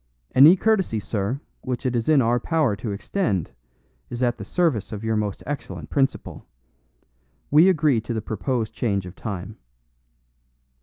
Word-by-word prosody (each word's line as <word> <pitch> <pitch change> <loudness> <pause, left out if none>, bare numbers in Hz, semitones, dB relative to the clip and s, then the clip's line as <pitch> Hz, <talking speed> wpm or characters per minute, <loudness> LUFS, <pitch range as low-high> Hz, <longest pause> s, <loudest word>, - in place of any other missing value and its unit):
"Any 150 +7 +8
courtesy, 195 - +1
sir, 105 +5 -3 0.2
which 130 0 -4
it 125 -1 0
is 115 +4 -1
in 145 -4 +5
our 120 +2 +2
power 150 -5 +1
to 105 +1 -5
extend 100 - -2 0.6
is 120 +1 -3
at 120 -1 0
the - - -5
service 160 - 0
of 105 0 -6
your 105 -2 0
excellent 145 +1 -6
principal. 135 -1 -1 1.0
We 160 +6 +7
agree 150 -9 +2
to 115 - -5
the - - 0
proposed 110 +1 -2
change 100 -5 -1
of 90 +1 -9
time." 100 -1 -6
120 Hz, 150 wpm, -23 LUFS, 105-145 Hz, 1.0 s, Any